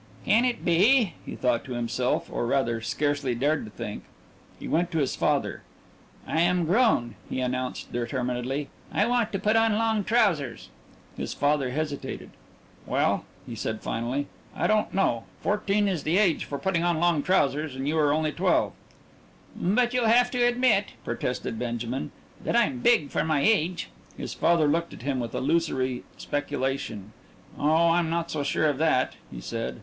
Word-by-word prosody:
"Can 230 +4 +4
it 250 -1 -1
be 200 +4 +4
?" - - -24
he - - -5
thought 125 -2 +1
to 130 - -5
himself, 120 +1 -1
or, 120 - -1
rather, 120 -3 +1
scarcely 145 0 -1
dared 145 +4 0
to - - -9
think. - - -6 0.6
He - - -7
went 175 +2 +1
to 165 - -3
his 140 -4 0
father. - - 0 0.6
"I 160 - 0
am 175 0 +2
grown," 180 - +2 0.2
he - - -2
announced 130 0 -3
determinedly. 125 +3 -2 0.2
"I 205 - +2
want 240 -2 +1
to 195 - -1
put 210 +3 +1
on 225 -1 +3
long 220 -2 +1
trousers." 190 - +1 0.5
His - - -4
father 145 -2 +1
hesitated. 145 +1 -4 0.6
"Well," - - +1 0.2
he 120 - -7
said 110 -1 -4
finally, 120 +5 -2 0.3
"I - - -1
don't 215 0 +2
know. 120 -12 +1
Fourteen 205 0 +1
is 180 -6 -1
the 160 +5 +1
age 195 -6 +2
for 140 - -4
putting 170 +3 0
on 175 -2 +1
long 170 -3 +3
trousers 150 -4 +1
and 135 +1 -3
you 155 - 0
are 145 -2 +3
only 155 +1 +1
twelve." - - +1 0.8
"But 240 +7 +1
you'll 245 -2 +2
have 245 +2 +4
to 245 -1 +1
admit," 240 -4 +2
protested 120 -1 -3
Benjamin, 120 +2 -3 0.3
"that - - -1
I'm 235 +2 +2
big 235 -12 +3
for - - 0
my 155 -3 +1
age." 180 -3 +1 0.3
His - - -5
father 170 -2 +3
looked 170 +3 0
at - - -12
him 135 -1 -1
with 120 -2 -4
illusory 130 -5 0
speculation. 135 -8 -3 0.5
"Oh, 160 +3 +4
I'm 170 -1 +2
not 170 0 -1
so 150 - -1
sure 145 +2 0
of 145 -3 +1
that," 155 -5 +2 0.2
he - - -7
said. 115 - -4
155 Hz, 175 wpm, -26 LUFS, 130-195 Hz, 0.8 s, Can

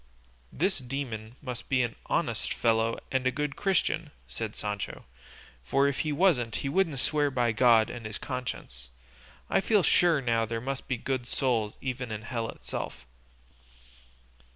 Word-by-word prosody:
"This 185 +3 0
demon 120 -4 -5
must 125 -3 -6
be 130 -2 +3
an 120 - -2
honest - - 0
fellow 115 0 +2
and 130 -1 +1
a - - +3
good 145 +1 -2
Christian," 170 -5 +1 0.2
said 110 -2 -5
Sancho; 105 -1 -4 0.6
"for 135 - +3
if 140 - -1
he 155 - 0
wasn't 145 - +3
he - - +1
wouldn't 160 -2 +2
swear 145 +2 +2
by 125 -3 +2
God 115 -1 +5
and 120 -3 -6
his 110 - -5
conscience; 125 - -5 0.6
I - - +3
feel 205 -1 +3
sure 170 -3 +5
now 115 -3 +2
there 115 +1 -2
must 135 +3 -4
be 130 - 0
good 130 0 -2
souls 115 -7 0
even 125 -3 -3
in 110 0 -4
hell 115 -1 -2
itself." - - -5
125 Hz, 155 wpm, -29 LUFS, 115-140 Hz, 0.6 s, God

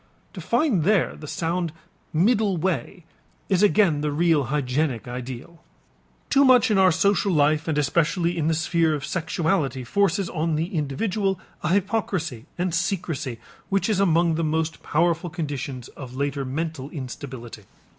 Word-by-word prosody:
To 185 - -7
find 230 - +1
there 200 +1 +2
the 150 - -10
sound 170 +1 -2 0.4
middle 205 +3 +2
way 180 +1 -2 0.4
is 190 -2 +3
again 200 -7 +4
the 150 0 -1
real 155 -2 +2
hygienic 130 -2 -1
ideal. 125 +6 -7 0.7
Too 280 0 +5
much 250 -4 +5
in 200 - +3
our 190 -1 +6
social 200 +3 +2
life 155 0 +2
and 155 -2 0
especially 170 +4 +1
in 160 -3 0
the 160 - +2
sphere 165 -1 +1
of 145 - -5
sexuality 160 -6 -1
forces 195 - +1
on 160 -1 0
the 165 +6 -2
individual 190 +6 -1 0.2
a 155 - -1
hypocrisy 190 - -1
and 180 -1 -1
secrecy 165 - -2 0.3
which 195 +2 +1
is 210 -3 +1
among 170 -3 +3
the 165 +1 -1
most 160 +1 -1
powerful 170 +2 +1
conditions 145 -6 -5
of 130 -3 -10
later 140 0 -1
mental 145 0 -4
instability. 130 -5 -7
165 Hz, 150 wpm, -24 LUFS, 145-185 Hz, 0.7 s, our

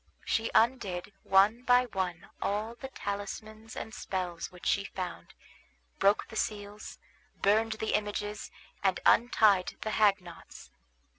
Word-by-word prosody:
She 225 0 0
undid 205 -6 +1
one 200 +5 +4
by 250 0 +4
one 185 -6 -4
all 210 +3 -1
the 265 +3 -8
talismans 215 0 -6
and 220 - -6
spells 180 -6 -4
which 180 -1 -13
she 200 - +2
found, 185 -3 -6 0.6
broke 200 +1 +3
the - - -10
seals, 210 -1 -4 0.5
burned 220 +3 +3
the 220 0 -2
images, 210 0 -3 0.3
and 190 -2 +2
untied 215 -5 +4
the 215 - -2
hagknots. 195 -6 0
205 Hz, 125 wpm, -30 LUFS, 195-220 Hz, 0.6 s, one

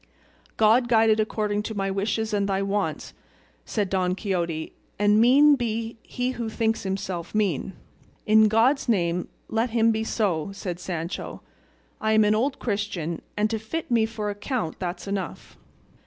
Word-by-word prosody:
"God 225 +3 +4
guide 225 -1 +5
it 215 - +2
according 210 -1 0
to 220 +1 -5
my 195 -1 -1
wishes 210 +3 -1
and 200 -1 +1
thy 195 0 0
wants," 200 +1 -2 0.5
said 210 -3 -1
Don 185 -1 0
Quixote, 170 -6 -2 0.2
"and 210 +1 +4
mean 280 +5 +7
be 230 -2 -3
he 250 +1 -3
who 235 -3 -4
thinks 225 0 0
himself 190 -2 -4
mean." 195 -4 0 0.5
"In 215 0 +6
God's 240 +6 +2
name 180 -4 +1 0.2
let 225 +2 0
him 230 0 +3
be 220 0 -1
so," 195 -8 -1
said 180 -3 -5
Sancho: 175 0 -5 0.6
"I 220 0 +1
am 220 0 +5
an 210 0 +3
old 265 +6 0
Christian, 200 -7 -3 0.2
and 210 +1 +3
to 220 - -1
fit 250 +8 -5
me 225 -2 +3
for 215 -2 -3
a - - -4
count 205 - -3
that's 180 +1 -4
enough." 195 -4 -5
210 Hz, 165 wpm, -25 LUFS, 195-225 Hz, 0.6 s, mean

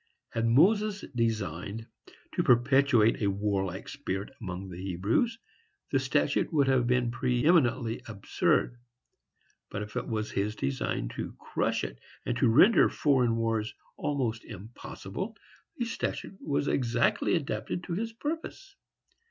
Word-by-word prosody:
Had 115 0 0
Moses 205 - +3
designed 110 -3 -2 0.5
to - - +1
perpetuate 125 -2 +4
a 100 - +2
warlike 95 -1 -2
spirit 105 -7 -4
among 95 -1 -5
the 90 0 -8
Hebrews, 100 - 0 0.5
the - - +3
statute - - +1
would 145 -4 +3
have 130 -2 +3
been 125 -1 +2
preëminently 125 -1 +2
absurd; 110 +3 0 0.9
but, 105 - -4
if 105 0 -10
it - - -2
was 110 -1 -2
his 105 +2 -1
design 70 - -2
to - - -6
crush - - -1
it, - - -5 0.3
and 120 - -1
to 125 - +4
render 180 - +6
foreign 125 -6 +2
wars 115 -1 -1 0.2
almost 125 -6 -2
impossible, 115 - -7 0.4
the 240 - -1
statute 210 -4 -4
was 145 -1 -1
exactly 120 +4 +2
adapted 135 +1 -3
to 175 - -4
his 225 +6 -2
purpose. 325 - -5
120 Hz, 130 wpm, -29 LUFS, 105-145 Hz, 0.9 s, render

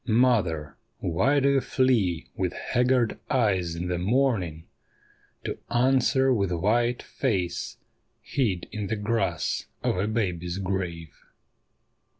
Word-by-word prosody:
Mother, 100 - +2 0.2
why 105 - +2
do 140 - +2
you 140 -1 +3
flee 110 -13 +1
with 90 -2 -1
haggard 125 -2 +1
eyes 95 -9 +1
in 85 +2 -3
the 90 -1 -1
morning 95 - +1 0.8
To - - -4
answer 130 +2 +3
with 100 -5 0
white 120 +7 +1
face 95 -10 -2 0.4
hid 105 -11 -1
in 105 -2 -4
the 110 - -1
grass 105 -6 -1 0.2
of - - +1
a 100 +3 0
baby's 90 -6 -2
grave 90 -5 -3
105 Hz, 120 wpm, -26 LUFS, 90-125 Hz, 0.8 s, you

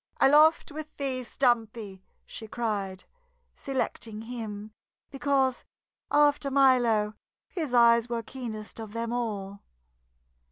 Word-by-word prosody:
"Aloft 305 +3 +5
with 305 +1 -8
thee, 265 -2 -2
Stumpy!" 225 -6 -1 0.2
she 220 - -8
cried, 205 -5 -3 0.5
selecting 230 -5 -4
him 220 -3 -6 0.4
because 270 -1 +1 0.5
after 290 -1 +3
Milo 245 -6 +3 0.3
his 315 -8 -4
eyes 235 0 +5
were 235 -1 -2
keenest 225 -3 -7
of 220 -2 -8
them 230 0 -3
all. 200 -5 -3
235 Hz, 105 wpm, -28 LUFS, 215-270 Hz, 0.5 s, Aloft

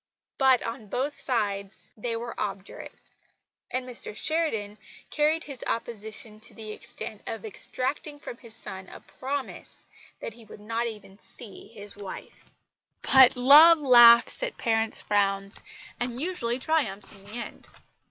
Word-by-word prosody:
But, 265 -2 +4
on 230 -1 -6
both 265 +7 -2
sides, 205 -7 -3
they 230 +1 -4
were 235 +1 -5
obdurate; 195 -1 -6 0.8
and 255 0 -3
Mr 235 -3 -2
Sheridan 225 -11 -1 0.3
carried 310 +2 +1
his 275 -4 -8
opposition 220 0 -5
to 220 - -8
the 220 -2 -8
extent 220 -2 -8
of 225 -1 -5
extracting 270 +7 -3
from 240 - -9
his 230 -3 -12
son 190 -1 -8
a - - -11
promise 275 +1 -7 0.3
that 230 - -7
he 230 +1 -15
would 215 - -13
not 230 +3 -3
even 210 -3 -10
see 225 -4 -8
his 205 -2 -12
wife. 200 -2 -10 0.5
But 265 -2 +7
love 295 +7 +8
laughs 240 - +7
at - - -3
parents' 225 -2 0
frowns 195 -1 +2 0.4
and 245 0 -3
usually 270 -8 -2
triumphs 245 -10 -2
in 195 - -16
the 205 - -12
end. 240 0 -7
235 Hz, 140 wpm, -26 LUFS, 210-265 Hz, 0.8 s, love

